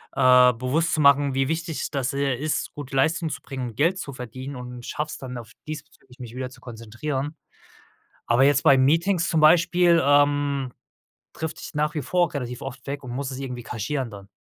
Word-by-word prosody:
äh, 125 -1 +6
bewusst 130 +8 0
zu 155 - +1
machen, 140 -1 +5
wie 135 0 +1
wichtig 160 0 -3
das, 135 -2 -1
äh, 140 -2 0
ist, 150 +4 -2
gute 140 -2 -7
Leistung 160 +4 +1
zu 135 - -6
bringen 130 -2 -5
und 110 - -13
Geld 170 +6 +2
zu 140 -6 -6
verdienen, 130 +3 -7
und 125 -1 -8
schaffe 150 0 -3
es - - -6
dann 125 -1 -7
auch 115 - -10 0.2
diesbezüglich, 145 -4 -10
mich 120 -1 -9
wieder 130 0 -4
zu - - -16
konzentrieren. 130 +6 -5 0.9
Aber 120 +3 +4
jetzt 140 -1 +3
bei 135 - +6
Meetings 170 +6 +2
zum 160 -2 +1
Beispiel, 170 +1 +5
ähm, 145 -2 +2 0.6
drifte 160 0 -5
ich - - -8
nach 150 +2 0
wie 150 - -2
vor 175 -1 +1
relativ 125 -2 -5
oft 135 -1 -8
weg 140 0 -4
und 125 - -7
muss 135 +2 -3
es 130 - -6
irgendwie 125 -3 -5
kaschieren 120 +3 -3
dann. 100 -2 -11
140 Hz, 200 wpm, -24 LUFS, 125-155 Hz, 0.9 s, äh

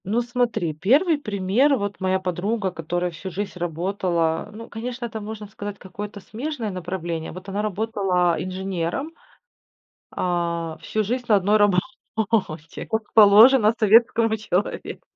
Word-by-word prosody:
Ну, 220 +6 +1
смотри, 240 -9 -1
1 280 - +3
пример: 210 +5 +2
вот 205 -2 -4
моя 190 0 +1
подруга, 190 +3 -2
которая 175 +1 -2
всю 170 +3 -7
жизнь 200 +3 -4
работала. 175 0 -1
Ну, 225 +2 -9
конечно, 240 +2 -5
это, 220 -2 -6
можно 215 0 -7
сказать, 205 0 -7
какое-то 205 +2 -8
смежное 240 0 -4
направление. 175 -3 -4
Вот 185 +3 -9
она 200 +2 -2
работала 195 -4 0
инженером, 185 - -3 1.0
а, 170 -2 -1
всю 215 - -1
жизнь 245 +4 -2
на 215 - +6
1 200 +3 +3
работе, 205 - -1
как 220 -1 -3
положено 220 +2 +7
советскому 225 +1 +4
человеку. 205 -2 -2
200 Hz, 130 wpm, -23 LUFS, 180-225 Hz, 1.0 s, положено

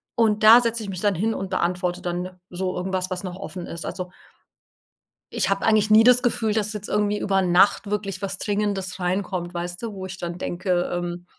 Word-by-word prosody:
Und 220 -3 +2
da 225 +3 +9
setze 235 -1 -1
ich - - -7
mich 185 -2 -5
dann 205 -2 +2
hin 220 +6 0
und 195 -2 -4
beantworte 180 -1 -1
dann 180 +1 -4
so 185 +1 -3
irgendwas, 185 0 -2
was 180 0 -3
noch 180 -1 -5
offen 190 -2 -7
ist. 170 - -4
Also 180 -1 -5 1.2
ich - - 0
habe 195 0 0
eigentlich 215 -1 +3
nie 215 +1 +7
das 250 0 +6
Gefühl, 225 -3 0
dass 215 -1 0
jetzt 210 -1 -7
irgendwie 210 0 +1
über 195 -2 +1
Nacht 185 +3 +3
wirklich 200 -2 -3
was 195 -1 -3
Dringendes 200 -3 -2
reinkommt, 180 -1 -2
weißt 175 +2 -5
du, 230 -2 -4
wo 190 -2 -6
ich 190 0 -7
dann 175 -1 -5
denke, 180 0 -1
ähm 175 0 -4
190 Hz, 205 wpm, -23 LUFS, 180-210 Hz, 1.2 s, da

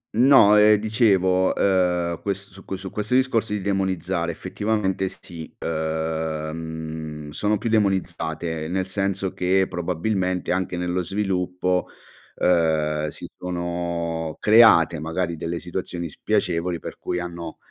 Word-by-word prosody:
No, 120 -4 +7
ehm, 105 0 +7
dicevo, 100 -4 +2
uhm, 90 -3 +1
ques 100 0 -4
su 95 +1 -14
qu 95 - -4
su 95 0 -7
questo 105 +4 -1
discorso 115 -4 +2
di 105 - -2
demonizzare, 95 -2 -1
effettivamente, 100 -3 -1
sì, 85 -3 -10
uhm, 80 -1 -4
sono 105 +7 0
più 115 - -4
demonizzate, 85 -6 -1
nel 95 +2 -1
senso 95 0 -2
che 95 +1 +2
probabilmente, 90 +1 -1
anche 90 -1 -1
nello 90 +1 -1
sviluppo, 90 -1 -1 0.5
uhm, 80 -3 +2
si - - -7
sono 85 -2 -3
create 105 -8 +6
magari 85 +2 -2
delle 85 +2 -4
situazioni 85 -1 -5
spiacevoli, 90 -4 -1
per - - -9
cui 90 - -2
hanno 85 -2 -6
90 Hz, 120 wpm, -23 LUFS, 80-95 Hz, 0.5 s, No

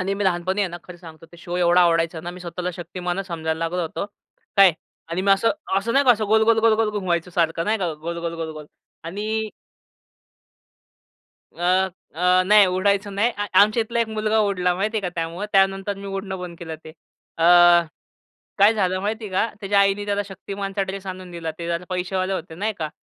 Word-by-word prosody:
आणि 195 +2 -1
मी 200 0 -2
लहानपणी 185 +2 0
आहे 195 - +1
ना, 175 - -7
खरं 180 - -11
सांगतो, 165 -2 -13
ते 170 - -13
शो 175 +1 -6
एवढा 175 0 +4
आवडायचा 165 -1 +2
ना, 170 +2 -6
मी 180 +1 -11
स्वतःला 180 +1 -4
शक्तिमानच 180 +2 -4
समजायला 160 -2 -3
लागलो 165 +2 -2
होतो. 165 +4 -4 0.5
काय? 195 -3 +7 0.4
आणि 170 +3 -2
मी 200 - +2
असं 210 +4 +3 0.3
असं 225 +4 -2
नाही 275 +2 +4
का, 255 - +6
असं 215 -1 -2
गोल-गोल-गोल-गोल 220 0 +3
घुमवायचं 180 -4 -2
सारखं 165 -1 0
नाही 220 +3 0
का 180 -4 -1
गोल-गोल-गोल-गोल 165 -1 -5 0.4
आणि 215 +5 -3 2.1
अ, - - -12 0.5
अ, 165 - -8 0.3
नाही 210 0 +7
उडायचं 200 +1 +1
नाही. 215 +5 +2
अ, 205 - -2
आमच्या 215 +3 +4
इथला 235 +1 -2
एक 230 - 0
मुलगा 215 0 0
उडला 180 -4 +1
माहिती 210 +4 -1
आहे - - +1
का 185 - -1
त्यामुळं. 170 +4 -3
त्यानंतर 195 0 +2
मी 200 0 -9
उडणं 195 -1 -5
बंद 180 -1 -7
केलं 160 -2 -6
ते. - - -9 0.5
अ, - - -1 1.2
काय 205 +3 +6
झालं 185 -3 0
माहिती 215 +2 -3
आहे 200 - -8
का? 220 +4 0
त्याच्या 200 -1 +1
आईने 200 +1 +2
त्याला 205 0 0
शक्तिमानचा 195 +1 -5
ड्रेस 195 0 -6
आणून 185 -1 -7
दिला. 165 -2 -5
ते 170 - -5
जरा 170 +1 -2
पैसेवाले 185 +1 -2
होतं 175 -3 -6
नाही 215 +2 -1
का 155 -2 -3
190 Hz, 190 wpm, -22 LUFS, 170-205 Hz, 2.1 s, काय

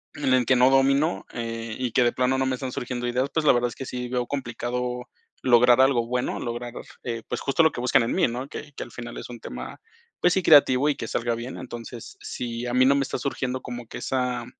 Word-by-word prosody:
en 135 -3 +1
el 125 -1 +3
que 130 - +4
no 125 +1 +6
domino, 135 +4 +3
eh, 115 -1 -4
y 125 -2 -2
que 125 - +3
de 120 - +3
plano 130 +1 +1
no 135 - +1
me 130 - 0
estárn 130 0 -5
surgiendo 125 0 -3
ideas, 125 +3 0
pues, 160 -2 0
la - - +9
verdad 120 0 +2
es - - -11
que 135 - -6
sí 125 0 -4
veo 125 -1 -1
complicado 125 -1 -3 0.3
lograr 125 0 +6
algo 130 -3 +3
bueno, 125 +1 -1
lograr, 120 0 -5 0.3
eh, 115 -2 -4
pues, - - -3
justo 140 +4 +2
lo 160 - +5
que - - -5
buscan 125 -1 +3
en 115 - -1
mí, - - +3
¿no? 125 +3 -4
Que 145 0 -9
que - - -5
al 120 - -12
final 120 0 -8
es - - -7
un 120 - -8
tema, - - -8 0.4
pues 180 - +4
sí, 190 - +1
creativo 145 -3 +6
y 145 - +2
que - - -5
salga 120 0 -1
bien. 120 +3 -6
Entonces, 120 - -8
si 120 - -5
a 120 - -3
mí 130 0 +5
no 135 - +6
me 140 - +2
está - - -3
surgiendo 130 -1 -3
como 120 -2 -7
que - - -8
esa 125 -2 -1
125 Hz, 250 wpm, -25 LUFS, 120-135 Hz, 0.4 s, la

